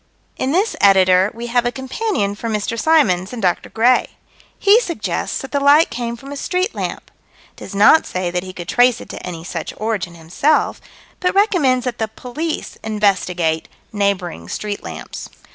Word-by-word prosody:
In 260 - -1
this 390 +8 +1
Editor 190 -1 +5
we 235 +1 -7
have 245 -1 +3
a 240 - 0
companion 265 - -2
for 230 +3 -5
Mr. 215 +1 -2
Symons 215 - +2
and 245 - -5
Dr. 180 -4 0
Gray. 240 +3 +2 0.4
He 410 +3 +5
suggests 345 -9 -3
that 270 - -7
the 285 - +1
light 285 +3 +5
came 235 -1 -3
from 270 +4 -11
a - - -5
street 365 +7 -1
lamp - - -5 0.4
does - - -9
not 210 +10 +6
say 185 -1 -2
that 180 0 -1
he 185 0 -8
could 175 -2 -8
trace 245 +3 +3
it - - -11
to - - -8
any 170 -3 -6
such 175 - -5
origin 205 -5 -3
himself 175 - 0 0.4
but 360 +1 0
recommends 305 - +3
that 250 -2 -3
the 220 - 0
police 255 +9 -5
investigate 185 -6 0 0.3
neighboring 185 - -1
street 205 - -4
lamps. - - -8
225 Hz, 175 wpm, -19 LUFS, 185-280 Hz, 0.4 s, not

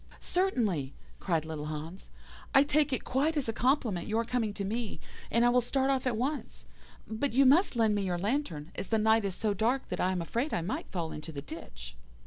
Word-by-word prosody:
"'Certainly,' 215 - 0 0.2
cried 165 -4 0
little 155 -2 -5
Hans, 155 +4 -6 0.5
'I 270 - +8
take 295 0 +2
it 260 - -1
quite 300 +5 +1
as 280 - 0
a 225 - -1
compliment 240 - +1
your 225 +2 0
coming 235 -3 0
to 200 - -3
me, 225 +1 -3 0.3
and 235 +2 +3
I - - +6
will 250 +1 +4
start 265 +3 +1
off 265 -1 0
at 235 -3 0
once. 280 +5 -3 0.4
But 225 +5 -2
you 270 +2 +5
must 295 +4 +5
lend 225 -2 +3
me 205 - 0
your 180 -2 -1
lantern, 180 - -2
as - - -5
the 225 - +2
night 220 0 +3
is 190 -2 -2
so 215 -2 0
dark 235 +6 0
that - - -3
I 185 - +2
am 185 - -1
afraid 235 - -1
I - - 0
might 175 - -4
fall 170 -4 -3
into 155 +2 -7
the 140 -2 -6
ditch. 65 - -9
220 Hz, 220 wpm, -30 LUFS, 175-265 Hz, 0.5 s, I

